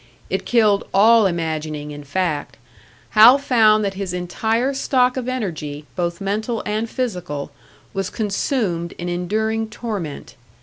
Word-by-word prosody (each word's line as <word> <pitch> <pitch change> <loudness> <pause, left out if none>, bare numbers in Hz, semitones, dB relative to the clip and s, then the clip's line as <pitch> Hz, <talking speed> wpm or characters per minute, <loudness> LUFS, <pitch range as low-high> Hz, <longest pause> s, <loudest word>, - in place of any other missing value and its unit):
It - - -2
killed 215 -4 +3
all 220 +1 +6
imagining, 155 -3 -3
in 145 0 -8
fact; 150 0 -2 0.5
Hal 225 +5 +8
found 220 -6 +4
that 195 - -1
his 190 -2 -4
entire 225 +9 -1
stock 255 -2 +2
of 255 -1 -3
energy, 155 - -4
both 170 -1 -2
mental 215 +4 -2
and 215 +2 -2
physical, 180 - -4 0.4
was 195 -2 -2
consumed 200 - -1
in 175 0 -5
enduring 220 +5 -1
torment. 210 -10 -5
200 Hz, 130 wpm, -21 LUFS, 170-225 Hz, 0.5 s, Hal